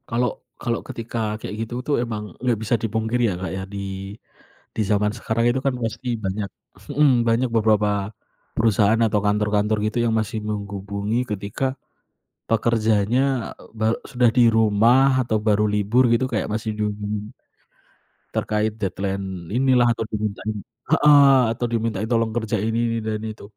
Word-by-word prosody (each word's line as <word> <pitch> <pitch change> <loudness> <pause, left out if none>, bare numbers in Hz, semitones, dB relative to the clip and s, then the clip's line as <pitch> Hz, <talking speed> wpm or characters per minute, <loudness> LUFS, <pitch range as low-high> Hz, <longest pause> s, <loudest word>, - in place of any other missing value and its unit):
Kalau 125 0 +1 0.3
kalau 115 -1 -1
ketika 115 0 -6 0.2
kayak 105 - -5
gitu 115 - -10
tuh 145 - +1
emang 110 -3 -4 0.2
gak 120 -3 +2
bisa 110 +2 +1
dipungkiri 110 +2 -1
ya - - -1
Kak 95 - -3
ya 95 - -4
di 95 0 -5 0.6
di - - -1
zaman 105 0 +2
sekarang 110 +2 -1
itu 125 +2 +1
kan 135 - +2
masih 125 +1 -4
banyak 100 +1 -2 0.5
mhm, 150 -1 +5 0.2
banyak 120 +3 +2
beberapa 105 -1 +3 0.7
perusahaan 110 -1 +3
atau 105 -1 +1
kantor-kantor 105 +1 +1
gitu 110 +2 -2
yang 115 - +1
masih 110 +1 -3
menghubungi 100 +2 -3
ketika, 105 +4 -3 0.9
pekerjaannya, 115 0 +2 0.3
eee, - - -18
be 110 - 0 0.2
sudah 125 -2 +2
di 125 - +7
rumah 120 +5 +4
atau 110 -2 +1
baru 105 0 +2
libur 105 +5 +3
gitu 115 +3 +2
kayak 110 - 0
masih 110 +1 -2
dihubungi, 105 0 -3 1.0
terkait 105 0 0
deadline 95 -2 -3
inilah, 125 -1 +4
atau 115 - -2
dimintain 105 0 -3 0.4
heeh, 145 -3 +7 0.2
atau 120 - -6
dimintain 110 -2 -1
tolong 115 -1 +2
kerjain 110 -2 -1
ini 115 - 0
ini 115 0 -1
dan 110 -1 -2
itu. 110 0 -8
110 Hz, 150 wpm, -22 LUFS, 105-115 Hz, 1.0 s, di